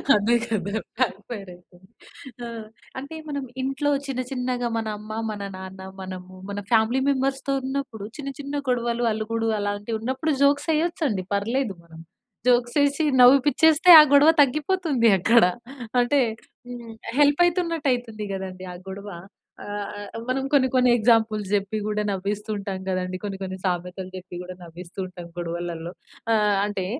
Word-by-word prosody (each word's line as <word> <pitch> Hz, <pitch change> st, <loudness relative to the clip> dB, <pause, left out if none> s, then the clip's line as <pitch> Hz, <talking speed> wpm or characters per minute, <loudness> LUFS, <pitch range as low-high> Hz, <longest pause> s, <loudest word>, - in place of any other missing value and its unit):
అదే 210 Hz, +3 st, +3 dB
కదా! 205 Hz, -4 st, -2 dB, 0.3 s
Back 250 Hz, -6 st, +1 dB
fire 200 Hz, -6 st, -6 dB
ఐతరు. 175 Hz, 0 st, -22 dB, 0.7 s
ఆ! -, -, -5 dB, 0.5 s
అంటే, 280 Hz, +4 st, -8 dB
మనం 285 Hz, -1 st, -3 dB, 0.2 s
ఇంట్లో 270 Hz, +2 st, 0 dB, 0.2 s
చిన్న 260 Hz, -2 st, -2 dB
చిన్నగా 250 Hz, -2 st, -1 dB
మన 225 Hz, -1 st, -2 dB
అమ్మ, 215 Hz, +1 st, -10 dB, 0.2 s
మన 205 Hz, -1 st, -6 dB, 0.2 s
నాన్న, 190 Hz, 0 st, -9 dB, 0.2 s
మనము, 185 Hz, -1 st, -8 dB, 0.2 s
మన 200 Hz, 0 st, -4 dB
ఫ్యామిలీ 230 Hz, +3 st, +3 dB
మెంబర్స్‌తో 270 Hz, 0 st, 0 dB
ఉన్నప్పుడు 265 Hz, -6 st, -4 dB
చిన్న, 280 Hz, -2 st, -5 dB
చిన్న 285 Hz, 0 st, -5 dB
గొడవలు 240 Hz, -1 st, 0 dB
అలుగుడు, 225 Hz, +1 st, -2 dB
అలాంటివి 205 Hz, +2 st, -2 dB
ఉన్నప్పుడు 260 Hz, +7 st, -1 dB
జోక్స్ 285 Hz, +2 st, +3 dB
వేయొచ్చు 335 Hz, +2 st, 0 dB
అండి 190 Hz, -5 st, -2 dB
పర్లేదు 225 Hz, +2 st, -1 dB
మనం. 165 Hz, -1 st, -14 dB, 0.5 s
జోక్స్ 240 Hz, -1 st, +3 dB
వేసి 285 Hz, +2 st, +2 dB, 0.2 s
నవ్విపించేస్తే, 290 Hz, +6 st, +5 dB
ఆ -, -, +12 dB
గొడవ 285 Hz, +2 st, +7 dB
తగ్గిపోతుంది 295 Hz, -2 st, +1 dB
అక్కడ. 230 Hz, +6 st, +5 dB, 0.6 s
అంటే 280 Hz, +4 st, +2 dB, 0.5 s
హ్మ్. 240 Hz, -2 st, -8 dB, 0.3 s
హెల్ప్ 290 Hz, +2 st, +5 dB
అయితున్నట్టు 335 Hz, -4 st, 0 dB
అయితుంది 225 Hz, -4 st, -5 dB
కదండీ! 185 Hz, -1 st, -6 dB
ఆ -, -, -9 dB
గొడవ. 200 Hz, +2 st, -7 dB, 0.5 s
ఆహ్, 205 Hz, 0 st, -4 dB, 0.3 s
ఆహ్, -, -, -5 dB
మనం 260 Hz, +1 st, 0 dB
కొన్ని, 275 Hz, -3 st, +4 dB
కొన్ని 250 Hz, -1 st, +4 dB
ఎగ్జాంపుల్స్ 220 Hz, -2 st, +2 dB
చెప్పి 200 Hz, +1 st, -1 dB
కూడా 210 Hz, 0 st, -1 dB
నవ్విస్తూ 200 Hz, +2 st, -3 dB
ఉంటాం 195 Hz, -1 st, -4 dB
కదండీ! 185 Hz, 0 st, -2 dB
కొన్ని, 200 Hz, -2 st, -4 dB
కొన్ని 190 Hz, 0 st, -5 dB
సామెతలు 180 Hz, +1 st, -3 dB
చెప్పి 185 Hz, -1 st, -10 dB
కూడా 180 Hz, 0 st, -8 dB
నవ్విస్తూ 170 Hz, +2 st, -11 dB
ఉంటాం 180 Hz, -2 st, -10 dB
గొడవలలో. 170 Hz, -1 st, -4 dB, 0.4 s
ఆహ్, 210 Hz, -2 st, +3 dB
అంటే 205 Hz, -3 st, -3 dB
225 Hz, 150 wpm, -24 LUFS, 195-270 Hz, 0.7 s, ఆ